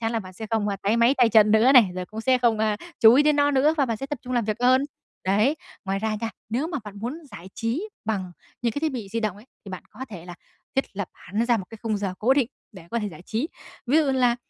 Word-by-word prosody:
chắn 225 0 -1
là 230 - 0
bạn 185 -3 -9
sẽ 220 +4 -7
không, 220 -2 +1
a, 200 - -1
táy 210 +3 +2
máy 235 +3 +4
tay 245 -2 +6
chân 215 -1 +5
nữa 220 +5 +5
này, 245 -7 +7
rồi 185 0 -4
cũng 215 +3 -7
sẽ 255 +2 +3
không, 235 -3 +2
a, 215 -1 +1 0.2
chú 225 +1 +8
ý 280 - +6
đến 300 0 +3
nó 285 0 +4
nữa 290 +3 +3
và 280 -3 +2
bạn 230 -2 -1
sẽ 270 - -6
tập 295 -1 -4
trung 250 - -6
làm 240 -2 +1
việc 215 0 -1
hơn, 255 +2 +4 0.4
đấy. 215 +10 +2 0.3
Ngoài 195 0 -1
ra 220 +1 -1
nha, 230 - -2 0.2
nếu 245 +8 -1
mà 325 -3 -3
bạn 205 -1 -9
muốn 240 +9 -4
giải 175 +3 -10
trí 250 - -2 0.2
bằng 195 -5 -2 0.3
những 235 - +1
cái 285 - -3
thiết 315 -1 0
bị 230 -6 -5
di 230 +3 -2
động 215 -4 -2
ấy, 210 +4 -16 0.2
thì 200 - -9
bạn 185 - -7
có 260 - -7
thể 180 -6 -9
là 175 - -8 0.4
thiết 270 - +2
lập 200 -3 -3
hẳn 210 +6 -3
ra 240 -1 +3
một 195 - -5
cái 225 - -10
khung 220 -2 0
giờ 195 -2 -3
cố 245 +5 +3
định 270 -5 +2 0.2
để 185 -5 -12
có 235 - 0
thể 210 -2 -2
giải 170 -2 -12
trí. 230 - -2 0.4
Ví 265 +5 +3
dụ 315 - +3
như 275 - +1
là, 245 -2 +3
225 Hz, 300 wpm, -24 LUFS, 205-260 Hz, 0.4 s, chú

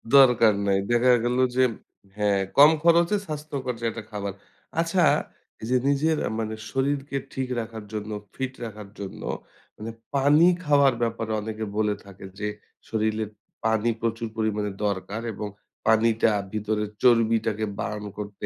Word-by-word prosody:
দরকার 120 -5 +7
নাই। 95 - +3
দেখা 120 +1 +5
গেল 120 +1 +1 0.2
যে 130 - +4 0.5
হ্যাঁ, 100 -2 +2 0.2
কম 145 +2 +9
খরচে 170 +4 +5
স্বাস্থ্যকর 145 -4 -4
যে 115 - -4
একটা 110 -1 -7
খাবার। 100 -2 -4 0.5
আচ্ছা, 170 +1 +2 0.6
এই 110 - -5
যে 125 - +4
নিজের 155 +3 +2 0.2
মানে 110 0 -2 0.2
শরীরকে 140 +1 -1 0.2
ঠিক 130 -1 -2
রাখার 110 -1 -6
জন্য, 105 0 -4 0.2
ফিট 130 0 -3
রাখার 105 -2 -8
জন্য 100 -1 -7 0.6
মানে 110 +2 -6 0.2
পানি 145 +5 +5 0.2
খাওয়ার 140 -4 +5
ব্যাপারে 115 -1 -1
অনেকে 110 0 -4
বলে 105 -1 +2
থাকে 95 -1 -11
যে 105 - -1 0.4
শরীরে 110 0 0 0.4
পানি 110 +1 +2
প্রচুর 115 0 -1
পরিমাণে 105 -2 0
দরকার 100 +2 -2
এবং 105 - -4 0.4
পানিটা 110 0 +4 0.2
ভিতরের 105 0 -1
চর্বিটাকে 115 -3 +3
বার্ন 105 -1 -3
করতে 105 -1 -6
115 Hz, 140 wpm, -25 LUFS, 105-130 Hz, 0.6 s, কম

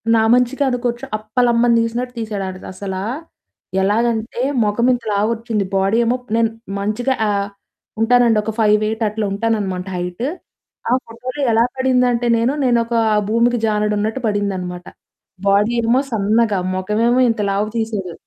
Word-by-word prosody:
నా 220 - +3
మంచికే 250 +3 +2
అనుకోవచ్చు. 240 -1 -2
అప్పలమ్మని 235 +2 +2
తీసినట్టు 245 +2 -3
తీసాడు. 215 -3 -3
ఆడిది 185 0 -8
అసలా 190 -1 -5 0.8
ఎలాగంటే 225 +3 0 0.2
మొఖమింత 235 +3 +1
లావొచ్చింది. 220 0 0
బాడీ 195 +3 +2
ఏమో 245 +2 +1 0.2
నేను 225 -1 +2 0.3
మంచిగా 225 +6 -1
ఆహ్, 200 -1 0 0.5
ఉంటానండి 235 -1 +4
ఒక 220 - -2
5'8 215 +1 +2
అట్లా 215 0 -3
ఉంటాననమాట 200 -4 -1
హైట్. 180 +6 -4 0.6
ఆ - - +3
ఫోటోలో 250 +5 -6
ఎలా 230 +1 +4
పడిందంటే 250 -2 +2
నేను 235 +4 +1
నేను 240 -2 +3
ఒక 235 0 -3 0.3
భూమికి 235 +2 +2
జానెడున్నట్టు 210 +3 0
పడిందనమాట. 185 -4 -2 0.6
బాడీ 205 +4 +3
ఏమో 235 +3 +3
సన్నగా 215 -1 +2 0.2
మొఖం 185 +3 -2
ఏమో 245 - +3
ఇంత 225 -2 -1
లావుగ 205 +2 0
తీసేడు. 210 -6 -3
225 Hz, 130 wpm, -19 LUFS, 205-240 Hz, 0.8 s, ఉంటానండి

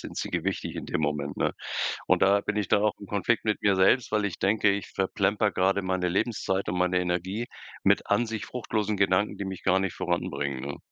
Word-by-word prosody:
sind - - -9
sie - - -3
gewichtig - - -2
in - - -5
dem - - -1
Moment, 75 -1 -2
ne? - - 0 0.5
Und - - +3
da 100 +1 +5
bin 105 +1 -3
ich 105 -3 -1
dann 105 -1 +3
auch 105 -1 +2
im 100 - -10
Konflikt 105 +4 0
mit 110 -1 0
mir 100 -2 +3
selbst, 105 +6 +4
weil 105 -1 +1
ich 95 -5 -3
denke, 100 +1 +3
ich 100 0 -2
verplemper 100 +2 +1
grade 95 +2 +2
meine 95 -1 0
Lebenszeit 95 0 -1
und 90 - -2
meine 90 0 +2
Energie 90 +5 -2 0.4
mit - - +3
an 120 - +2
sich 110 -1 -4
fruchtlosen 110 -4 -2
Gedanken, 100 +1 +2
die 100 - -4
mich 95 -1 -6
gar 95 0 +3
nicht 95 -1 -2
voranbringen, 70 -7 -2
ne? 70 +1 -5
95 Hz, 220 wpm, -27 LUFS, 90-105 Hz, 0.5 s, da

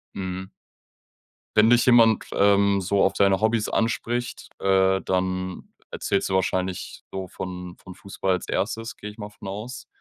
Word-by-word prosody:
Mhm. 95 0 -5 1.1
Wenn 105 +1 +6
dich 120 0 +5
jemand, 115 -3 +5
ähm, 100 0 +3
so 100 +2 +2
auf 95 - +3
deine 100 -1 +3
Hobbys 110 0 +1
anspricht, 120 +1 -2
äh, 95 0 +3
dann 95 0 -2 0.2
erzählst 100 - -1
du - - -2
wahrscheinlich 95 0 -2
so 95 -1 -5
von 90 -1 -7
von 90 - -12
Fußball 95 +1 -3
als 90 - -3
1., 115 0 -2
gehe 105 0 -7
ich 105 - -18
mal 105 -1 -6
von 105 -1 -12
aus. 110 +7 -7
100 Hz, 155 wpm, -24 LUFS, 95-110 Hz, 1.1 s, Wenn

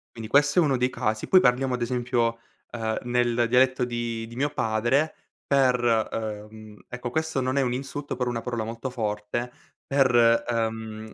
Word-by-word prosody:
Quindi 115 -1 -7
questo 145 +4 +4
è - - +6
uno 140 -5 +2
dei 125 +1 +1
casi. 110 -3 -2
Poi 185 - +7
parliamo, 130 -3 +2
ad 125 - -7
esempio, 120 -1 0 0.3
ehm, 110 -2 -2
nel 120 -1 +1
dialetto 130 +1 +3
di 120 -1 -3
di 115 - -11
mio 140 +4 0
padre 120 +4 0 0.3
per, 130 -3 +3 0.3
ehm 110 -1 -7
ecco, 125 0 -5
questo 160 -1 -1
non 130 +2 -1
è - - +4
un 125 -2 0
insulto, 135 +2 -5
però 125 0 -2
è - - -1
una 115 -1 -3
parola 120 -2 -3
molto 115 +4 -5
forte, 110 0 -3 0.3
per, 120 -4 +4
ehm, 110 -2 -3
120 Hz, 180 wpm, -25 LUFS, 115-130 Hz, 0.3 s, Poi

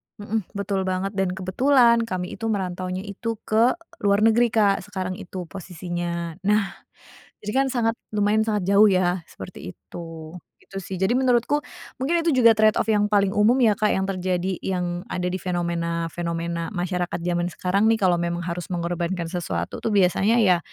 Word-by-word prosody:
Mhm, 210 -1 -3
betul 195 -1 -2
banget, 185 +1 -1
dan 195 -2 0
kebetulan 235 +5 +4
kami 180 -3 -3
itu 225 - -2
merantaunya 185 -2 -2
itu 225 +3 -4
ke 230 +6 +3 0.2
luar 200 +1 +2
negeri, 230 +2 +5
Kak, 210 -3 +2
sekarang 185 -2 -4
itu 180 0 -6
posisinya. 175 -1 -5
Nah, 210 -1 +2 0.7
jadi, 210 - -3
kan, 270 - +2
sangat 235 -3 +1 0.2
lumayan 210 +1 +1
sangat 210 -4 0
jauh, 200 +2 +6
ya, 185 -1 +2
seperti 185 - -9
itu. 165 -2 -9 0.2
Itu, 195 0 -9
sih, 190 +1 -6
jadi 190 +5 +2
menurutku, 255 +3 +2 0.4
mungkin 330 +6 +1
itu 330 - +3
juga 235 -3 +6
trade 215 0 +4
off 225 - -1
yang 210 -1 +3
paling 200 -2 +2
umum, 215 +4 +5
ya, 215 -3 +4
Kak, 215 - +2
yang 190 - 0
terjadi, 185 -1 -1
yang 180 -1 -2
ada 180 0 -2
di 185 - -2
fenomena-fenomena, 170 -1 -2
masyarakat 180 -1 -2
jaman 175 0 0
sekarang, 195 +3 0
nih, 225 -1 +3
kalau 180 -2 +3
memang 170 0 -2
harus 170 0 -4
mengorbankan 170 0 -2
sesuatu, 90 - -3
tuh, 225 - 0
biasanya, 200 +5 +3
ya, 180 -4 +4
190 Hz, 170 wpm, -24 LUFS, 175-215 Hz, 0.7 s, jauh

